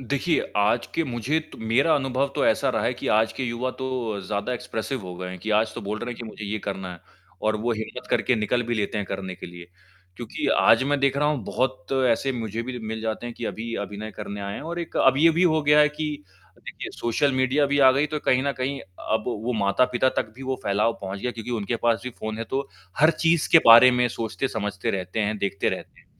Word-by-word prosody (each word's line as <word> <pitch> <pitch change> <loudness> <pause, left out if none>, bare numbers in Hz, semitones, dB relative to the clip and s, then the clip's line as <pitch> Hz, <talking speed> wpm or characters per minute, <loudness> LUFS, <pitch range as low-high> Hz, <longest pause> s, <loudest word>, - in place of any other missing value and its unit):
देखिए, 140 +6 0 0.2
आज 105 +3 +2
के 165 - +2
मुझे 130 +3 -1
तो - - -11
मेरा 120 +8 +3
अनुभव 135 0 0
तो - - +1
ऐसा - - +2
रहा - - -1
है - - +1
कि - - -7
आज 110 +1 +3
के - - -5
युवा 120 +1 -2
तो 125 -6 -3
ज़्यादा 105 +4 -2
एक्सप्रेसिव 125 +1 -4
हो 90 -1 -7
गए 90 +1 -5
हैं 95 - -7
कि 110 +5 -5
आज 110 +1 +1
तो - - -5
बोल 105 +2 -4
रहे 120 +2 -5
हैं 120 - -6
कि 120 - -6
मुझे 110 0 -8
ये 105 +2 -2
करना 95 -2 -5
है। 85 - -12 0.4
और 110 0 +1
वो 120 +2 0
हिम्मत 110 +3 -6
करके 125 - +2
निकल 110 +3 0
भी 120 0 -2
लेते 105 0 -1
हैं 100 - -3
करने 95 -1 -5
के - - -9
लिए। 85 0 -11 0.5
क्योंकि 120 0 -4
आज 115 +3 +5
मैं 145 +1 +1
देख 140 0 +2
रहा 150 +1 +2
हूँ 150 -5 -1
बहुत 130 0 -2 0.2
ऐसे 125 +4 +1
मुझे 115 -2 -3
भी 125 +1 -5
मिल 110 -1 -5
जाते 110 +1 -3
हैं 120 - -6
कि 120 - -6
अभी 115 +1 -4
अभिनय 105 +2 -7
करने 100 0 -6
आए 100 0 -4
हैं - - -6
और 170 +2 -5
एक 170 - -6
अब 135 0 +5
ये 165 +4 +6
भी 165 +2 +1
हो 160 -3 +4
गया 150 +1 +5
है 150 - +6
कि 150 +1 -4 0.5
देखिए - - -8
सोशल 135 +4 +1
मीडिया 130 +3 +2
भी 145 +1 +1
आ 135 -2 +8
गई 140 +3 +2
तो 150 0 -3
कहीं 130 -2 +2
न 140 0 0
कहीं 135 +2 -2
अब 110 +4 -3
वो 120 0 -2
माता-पिता 125 +5 +2
तक 110 - -1
भी 135 - -9
वो 130 0 -2
फ़ैलाव 105 +3 +2
पहुँच 95 0 -5
गया 125 - -1
क्योंकि 115 +1 -7
उनके 115 0 -1
पास 115 -3 +2
भी 125 - -4
फ़ोन 110 0 -4
है 115 - -3
तो 135 +1 -2 0.3
हर 155 +2 +7
चीज़ 165 -1 +3
के 165 - +10
बारे 115 +2 +10
में 125 0 +2
सोचते 115 +3 -3
समझते 105 -4 -3
रहते 95 +2 -3
हैं, 105 0 0
देखते 100 0 -1
रहते - - -6
हैं। - - -27
120 Hz, 250 wpm, -25 LUFS, 105-135 Hz, 0.5 s, के